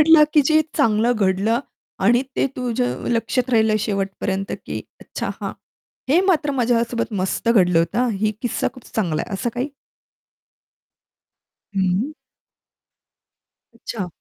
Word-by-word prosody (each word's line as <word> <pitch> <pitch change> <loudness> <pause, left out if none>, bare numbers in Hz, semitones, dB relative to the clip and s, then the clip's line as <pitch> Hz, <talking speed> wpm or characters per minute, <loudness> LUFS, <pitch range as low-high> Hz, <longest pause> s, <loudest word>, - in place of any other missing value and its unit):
भेटलं 310 0 +7
की 300 - +6
जे 310 +3 +4 0.2
चांगलं 230 -4 +3
घडलं 200 +3 +1 0.4
आणि 240 +4 +5
ते - - +3
तुझ्या 240 - 0 0.2
लक्षात 240 +2 0
राहिलं 220 -2 +4
शेवट 195 -2 -1
पर्यंत, 195 0 -2
की - - -4 0.2
"अच्छा - - -5
हां. - - -3 0.6
हे 310 +7 +5
मात्र 300 -4 +1
माझ्या 240 -3 +2
सोबत 235 -1 -2
मस्त 190 +4 -1
घडलं 180 -7 +4
होतं, 165 +6 0
हां. 250 -1 +2
ही 215 +1 0
किस्सा 245 - 0
खूप 255 - -13
चांगला 170 -8 0
आहे." 230 - -9
असं 235 +5 -2
काही? 250 +4 -2 2.1
हं. 190 +9 +1 1.6
अच्छा. 200 -6 -5
230 Hz, 135 wpm, -21 LUFS, 195-250 Hz, 2.1 s, भेटलं